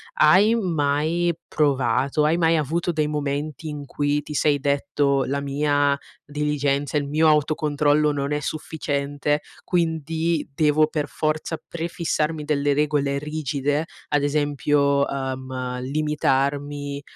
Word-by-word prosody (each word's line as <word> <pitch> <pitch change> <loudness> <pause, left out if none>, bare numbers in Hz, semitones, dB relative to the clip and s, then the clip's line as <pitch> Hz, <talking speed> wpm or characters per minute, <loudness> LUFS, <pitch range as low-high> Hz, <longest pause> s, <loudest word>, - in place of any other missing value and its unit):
hai 190 +8 +5
mai 165 -2 +1
provato 135 0 +1
hai 160 +3 +2
mai 165 -1 +3
avuto 165 +4 -1
dei 155 -2 0
momenti 150 +1 -3
in 145 -1 -6
cui 145 +1 0
ti 150 - -7
sei 145 0 +2
detto: 140 0 +1
"La 140 +2 -2
mia 145 0 +1 0.3
diligenza, 145 -1 -1
il 145 -1 -1
mio 155 +3 +3
autocontrollo 150 0 +2
non 140 0 -2
è 150 - 0
sufficiente, 145 -1 -2 0.2
quindi 165 -1 0
devo 155 +1 +3
per 150 -2 -2
forza 155 +2 -2
prefissarmi 165 -2 -2
delle 145 -1 +1
regole 145 -1 +1
rigide?" 150 0 -2 0.2
Ad 145 -1 +1
esempio, 145 -1 +2
ehm: 130 -2 -4
"Limitarmi 145 0 -1
145 Hz, 120 wpm, -23 LUFS, 140-155 Hz, 0.3 s, hai